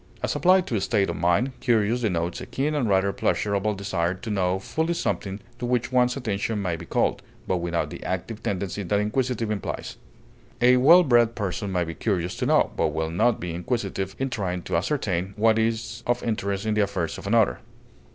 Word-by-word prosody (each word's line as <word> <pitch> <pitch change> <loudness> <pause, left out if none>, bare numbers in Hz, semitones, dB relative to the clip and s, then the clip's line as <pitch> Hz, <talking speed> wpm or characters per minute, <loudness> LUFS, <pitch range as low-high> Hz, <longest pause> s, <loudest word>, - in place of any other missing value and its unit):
As - - 0
applied 185 0 +4
to 115 - -2
a 100 - 0
state 100 -3 +1
of - - -5
mind, 90 +10 +2
curious 120 -1 +2
denotes 90 -6 -1
a - - -7
keen 135 +5 -1
and 135 -7 0
rather 100 0 +2
pleasurable 100 +1 0
desire 95 -3 -1
to 110 +4 -6
know 95 -2 +1
fully 160 - -2
something 100 - -2 0.2
to 125 - -3
which 125 0 0
one's 125 0 +3
attention 105 -3 -2
has 85 -2 -1
been - - -9
called, - - +1 0.3
but 95 - +1
without 85 -1 -2
the - - -8
active 95 +4 -4
tendency 100 +1 -3
that 100 +2 0
inquisitive 115 +1 -1
implies; 105 -2 -4 0.6
a 125 +1 +5
well 165 +8 +7
bred 120 -5 +3
person 100 -1 -3
may 90 -2 +1
be 80 0 -5
curious 90 -2 -1
to - - -1
know, - - +3
but - - +2
will 80 0 -2
not 110 +7 +2
be 85 -1 -4
inquisitive 95 0 -3
in 135 0 -2
trying 90 -6 -2
to - - -3
ascertain, 95 - -1
what 110 +1 +4
is 115 +1 -1
of 120 0 +1
interest 100 -3 -2
in 110 - +1
the 105 - +2
affairs 95 -5 -2
of - - -8
another. 110 0 +3
105 Hz, 200 wpm, -25 LUFS, 95-120 Hz, 0.6 s, well